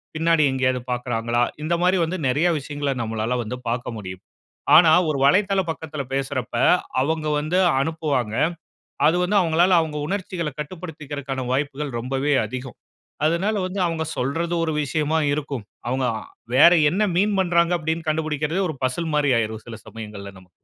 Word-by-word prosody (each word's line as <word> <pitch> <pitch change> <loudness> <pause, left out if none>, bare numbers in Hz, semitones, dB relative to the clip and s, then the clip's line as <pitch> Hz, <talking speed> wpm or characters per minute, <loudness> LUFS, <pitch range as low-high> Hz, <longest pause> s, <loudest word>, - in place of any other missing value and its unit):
பின்னாடி 165 0 +3
எங்கயாவது 130 -1 0
பாக்குறாங்களா? 120 -1 -1 0.2
இந்த 160 +3 0
மாதிரி 185 +1 +3
வந்து, 175 +3 -3
நெறைய 145 +7 +2
விஷயங்கள, 145 0 -3
நம்மளால 110 +2 -2
வந்து 115 +3 -5
பாக்க 120 +1 -2
முடியும். 95 -2 -8 0.5
ஆனா 165 0 +8 0.2
ஒரு 150 - 0
வலைதள 195 +7 +3
பக்கத்துல 155 -3 -4
பேசுறப்ப, 135 -3 -2 0.5
அவங்க 155 +2 -1
வந்து, 155 +5 -1 0.2
அனுப்புவாங்க. 140 -8 -1 0.7
அது 160 +3 +4
வந்து 200 +4 +1
அவுங்களால 175 +1 +3
அவுங்க 155 -2 -3
உணர்ச்சிகள 185 -4 -3
கட்டுப்படுத்திக்கிறதுக்கான 145 -5 -6
வாய்ப்புகள், 145 +1 -2
ரொம்பவே 135 +4 -1
அதிகம். 125 +2 -7 0.5
அதனால 175 +7 +1
வந்து, 185 +2 -4
அவுங்க 165 -1 -2
சொல்றது 165 +7 -1
ஒரு 160 - -1
விஷயமா 155 +2 0 0.2
இருக்கும். 140 -7 -5 0.2
அவுங்க 130 +1 0
அ - - -8 0.3
வேற 170 +6 +8 0.2
என்ன 200 +4 +1
மீண் 205 +2 +2
பண்ராங்க, 170 -1 +2
அப்படின்னு 160 +1 -3
கண்டுபிடிக்கிறதே, 155 +3 -1
ஒரு 155 - -7
பசில் 160 +6 -1
மாரி 145 -2 +3
ஆயிரும். 110 -1 -3
சில 115 -2 -8
சமயங்கள்ல 105 -3 -8
நமக்கு. 95 -1 -19
150 Hz, 150 wpm, -23 LUFS, 130-165 Hz, 0.7 s, ஆனா